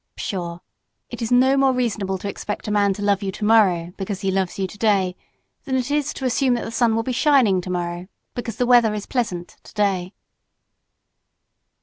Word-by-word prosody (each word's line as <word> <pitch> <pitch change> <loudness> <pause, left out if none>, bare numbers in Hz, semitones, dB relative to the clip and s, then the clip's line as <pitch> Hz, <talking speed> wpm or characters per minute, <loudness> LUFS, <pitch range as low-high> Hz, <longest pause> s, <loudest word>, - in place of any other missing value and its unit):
Pshaw! 170 -3 -4 0.5
It - - -7
is 230 - -2
no 260 +2 +5
more 270 -1 +4
reasonable 210 -6 -1
to 195 - -6
expect 205 +1 -5
a - - -1
man 205 -1 +3
to 205 - -6
love 200 -1 +2
you 195 -1 -2
tomorrow 190 -5 +2
because 195 0 -4
he 195 - 0
loves 190 -1 -1
you 195 - 0
today, 195 -2 0 0.5
than 265 -3 -1
it 260 +1 -1
is 295 -1 0
to 265 - -5
assume 255 0 +2
that 240 - -3
the - - -6
sun 230 -1 +2
will 225 - 0
be 255 - -2
shining 250 -8 +3
tomorrow 175 0 -4 0.3
because 240 -2 -5
the 250 - 0
weather 240 -3 +5
is 205 - -5
pleasant 180 -9 -3
today. 195 -4 -1
210 Hz, 190 wpm, -22 LUFS, 190-245 Hz, 0.5 s, no